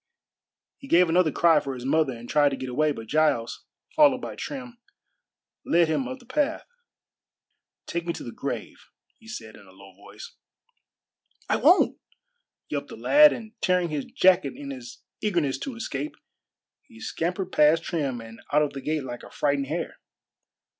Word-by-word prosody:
He 275 - -11
gave 180 -6 +5
another 170 -1 +3
cry 165 +1 +4
for 135 -2 -5
his 125 0 -8
mother 145 -1 +2
and 120 +1 -11
tried 145 +1 +4
to 135 - -3
get 130 -1 -6
away, 155 +4 +2
but 115 -5 -6
Giles, 150 -3 0 0.3
followed 290 -4 +6
by - - -6
Trim, 250 -4 -7 0.8
led 170 0 +3
him 260 - 0
up 260 0 -5
the 250 - -19
path. 275 +3 -1 1.2
"Take 170 0 -4
me 170 - 0
to - - -8
the - - -7
grave," - - -5 0.4
he 225 - -18
said 110 - -8
in 100 - -16
a - - -16
low 95 0 -16
voice. 100 +2 -12 1.1
"I - - +2
won't!" 350 +6 +4 0.7
yelped - - -4
the - - -9
lad, 300 +1 +7
and 220 -2 -7
tearing 180 -2 +2
his 150 -3 -3
jacket 185 0 +3
in 280 +1 -7
his 255 -2 -10 0.2
eagerness 170 -10 0
to 265 - -5
escape, 150 -10 -4 0.7
he 110 - -16
scampered 180 - -3
past 155 +1 +4
Trim 140 -9 -2
and 115 0 -12
out 150 +1 +4
of 150 - -2
the 135 - -6
gate 155 +1 -2
like 120 -2 -7
a - - -12
frightened 140 -2 0
hare. 165 +4 -4
160 Hz, 175 wpm, -26 LUFS, 135-225 Hz, 1.2 s, lad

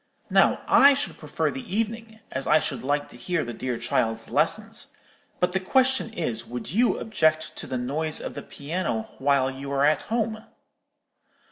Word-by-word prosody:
Now - - +4
I 280 +1 +7
should 280 +1 -4
prefer 155 0 -1
the 135 - -5
evening, 225 0 -3
as 130 +1 -3
I 155 - +6
should 155 -6 -2
like 145 +3 0
to - - -12
hear 165 +6 -1
the 120 - -5
dear 125 0 -3
child's 115 -2 -1
lessons; - - 0 0.5
but 180 0 +1
the 190 - +2
question 260 +5 +2
is, 125 - -2
would 125 +3 -6
you 235 +6 +3
object 160 -8 +1
to - - -4
the 130 - -2
noise 150 +5 -1
of - - -5
the - - -6
piano 145 -6 -3 0.2
while 135 -1 +2
you 135 +1 -7
are 140 0 +3
at 155 +1 +3
home?' 220 -1 -1
155 Hz, 175 wpm, -26 LUFS, 130-220 Hz, 0.5 s, I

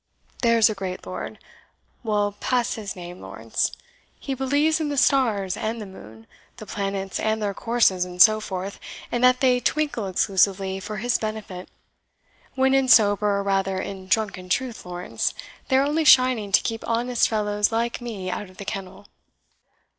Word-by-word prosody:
There's 230 -3 +5
a 220 - -1
great 190 -2 -6
lord 185 +3 -6 0.6
we'll 210 -3 0
pass 240 +4 -1
his 210 -4 -6
name, 175 0 -9
Lawrence - - -2 0.5
he 275 - -4
believes 285 +5 +1
in 310 -2 -1
the 285 - -3
stars 220 -9 +2
and 225 +2 -3
the 215 - -6
moon, 110 - -13 0.3
the 215 - -9
planets 195 -1 -3
and 220 0 0
their 205 -2 -2
courses, 225 -5 +2
and 180 0 -8
so 215 +3 +7
forth, 195 -1 -5 0.3
and 240 0 -1
that 250 0 +5
they 250 -2 +4
twinkle 290 -7 -1
exclusively 190 0 +1
for 210 +2 -6
his 240 +4 0
benefit, 215 -4 -6 0.9
when 265 0 +3
in 270 -1 +3
sober, 210 -3 +5
or 200 - -1
rather 195 -1 0
in 190 0 -6
drunken 190 -3 -1
truth, 240 -2 -2
Lawrence, 180 0 -3 0.3
they 260 - +3
are 270 - +3
only 305 +3 +1
shining 255 -7 +5
to - - +4
keep 225 0 -3
honest 240 +1 +1
fellows 210 -1 0
like 235 +2 -1
me 200 -6 -5
out 205 0 -5
of 185 - -19
the 200 - -8
kennel. 195 -1 -6
215 Hz, 170 wpm, -24 LUFS, 195-245 Hz, 0.9 s, so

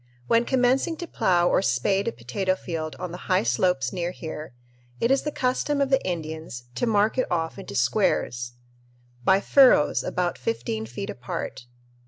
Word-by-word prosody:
When 230 - +3
commencing 265 +6 +2
to 345 - -5
plough 175 - +2
or - - +3
spade 190 +7 +1
a - - +1
potato 125 +12 -2
field 160 -4 -5
on 180 -2 -5
the 175 - -9
high 185 - +3
slopes 130 +3 +1
near 175 -1 -2
here, 160 -3 -7 0.5
it 235 - +2
is 270 - +4
the 300 - -3
custom 275 +2 0
of 275 -1 +1
the 270 - +3
Indians 160 -7 -5
to 245 - -1
mark 215 +3 +2
it 255 - +1
off 165 +2 -1
into 195 - -8
squares, 120 - +1 0.7
by 190 +6 +5
"furrows" 255 - +5
about 180 -1 -1
fifteen 115 -2 -3
feet 125 - -5
apart. 120 0 -6
180 Hz, 170 wpm, -25 LUFS, -, 0.7 s, by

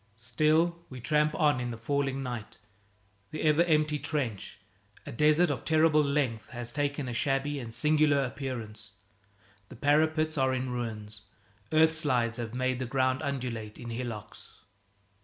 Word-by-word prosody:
Still 160 +8 +1
we 130 - -8
tramp 150 +4 +1
on 145 -4 +3
in 125 -1 -3
the 115 - -5
falling 135 +2 -1
night. 120 -5 -6 0.7
The 155 - -5
ever 155 +2 +4
empty 150 -2 +2
trench 130 -11 -3 0.5
a - - -7
desert 155 +7 +3
of - - -4
terrible 155 -1 +4
length 140 -6 -1
has 120 -2 -5
taken 145 -1 -2
a 120 - -4
shabby 140 +2 0
and 115 -3 -7
singular 150 +4 +3
appearance. 110 -5 -6 0.8
The - - -11
parapets 155 +3 +2
are 130 0 +2
in 130 0 -3
ruins; 110 -3 -5 0.5
earthslides 155 -7 +2
have 120 -1 -5
made 130 0 0
the 130 - -3
ground 130 +1 +1
undulate 125 -7 -4
in 120 -1 -7
hillocks. 115 -3 -7
135 Hz, 145 wpm, -29 LUFS, 120-150 Hz, 0.8 s, ever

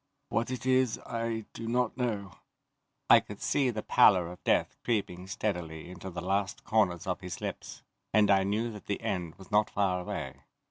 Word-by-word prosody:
What 115 +2 0
it 130 -1 -4
is 130 -2 +3
I 115 -2 -3
do 115 - -6
not 125 0 +1
know." 105 -7 -2 0.8
I - - +9
could - - -10
see 135 -3 +1
the 110 -3 -3
pallor 90 -4 +5
of 90 - -12
death - - +2
creeping 95 -6 -1
steadily 90 -5 -3
into 95 +1 -7
the 85 -1 -6
last 95 +1 -1
corners 95 -6 +1
of 95 +1 -2
his 90 -2 -6
lips, - - -6 0.3
and 105 -1 +5
I 95 -1 +5
knew 110 +4 0
that 105 -2 -11
the 100 - -2
end 90 -4 -3
was 95 - -15
not 105 0 +4
far 95 -3 +1
away. 90 - -5
100 Hz, 185 wpm, -30 LUFS, 90-115 Hz, 0.8 s, I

